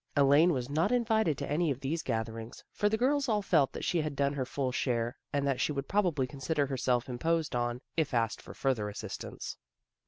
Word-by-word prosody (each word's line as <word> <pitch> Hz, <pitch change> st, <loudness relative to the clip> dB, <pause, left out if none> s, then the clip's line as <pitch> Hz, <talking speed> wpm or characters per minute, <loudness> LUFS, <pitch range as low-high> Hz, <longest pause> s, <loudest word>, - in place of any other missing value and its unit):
Elaine 145 Hz, +5 st, +6 dB
was 125 Hz, -5 st, -1 dB
not 155 Hz, -, +1 dB
invited 220 Hz, -, +2 dB
to -, -, -4 dB
any 160 Hz, +3 st, +1 dB
of 135 Hz, -3 st, -1 dB
these 160 Hz, +5 st, -1 dB
gath 115 Hz, -5 st, -1 dB
erings, 115 Hz, +1 st, -8 dB
for 205 Hz, -, +1 dB
the 220 Hz, -, +1 dB
girls 275 Hz, +3 st, +2 dB
all 210 Hz, -2 st, +1 dB
felt 155 Hz, -8 st, +3 dB
that -, -, -5 dB
she 170 Hz, -, +1 dB
had 150 Hz, -2 st, -3 dB
done 140 Hz, 0 st, +1 dB
her 130 Hz, -3 st, -2 dB
full 130 Hz, -1 st, -1 dB
share, 120 Hz, -2 st, 0 dB, 0.2 s
and 140 Hz, -1 st, 0 dB
that 135 Hz, -2 st, 0 dB
she -, -, +1 dB
would 140 Hz, -1 st, -3 dB
probably 175 Hz, -10 st, +2 dB
con 130 Hz, +2 st, -10 dB
sider 150 Hz, +1 st, +1 dB
herself 130 Hz, -2 st, 0 dB
imposed 160 Hz, +4 st, 0 dB
on, 120 Hz, 0 st, -1 dB, 0.2 s
if 160 Hz, -3 st, +1 dB
asked 115 Hz, -3 st, 0 dB
for -, -, -11 dB
further 120 Hz, -6 st, 0 dB
assistance. 105 Hz, -, -6 dB
140 Hz, 220 wpm, -31 LUFS, 125-165 Hz, 0.2 s, Elaine